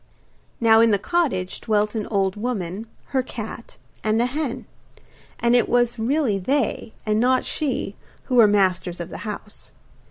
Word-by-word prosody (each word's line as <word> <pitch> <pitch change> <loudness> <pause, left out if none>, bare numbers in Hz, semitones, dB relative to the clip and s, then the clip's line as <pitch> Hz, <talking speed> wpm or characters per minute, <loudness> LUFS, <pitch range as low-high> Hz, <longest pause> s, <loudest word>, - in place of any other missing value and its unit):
Now 225 -1 +6
in 230 - +5
the 205 - +3
cottage 210 - -1
dwelt 210 -1 +1
an 215 -3 -3
old 195 -3 0
woman, 210 -2 -3 0.2
her 265 - +1
cat, 230 -2 -8 0.3
and 215 +1 +2
a 240 - +3
hen; 275 0 -3 0.7
and 235 +1 +3
it 245 - +3
was 240 -1 +2
really 240 -3 +1
they, 250 +1 -1
and 215 0 +1
not 255 +2 +3
she, 300 -4 -2 0.3
who 260 - -5
were 225 -3 +8
masters 185 -3 +1
of 170 - -5
the - - -7
house. 210 0 -9
225 Hz, 160 wpm, -23 LUFS, 205-250 Hz, 0.7 s, were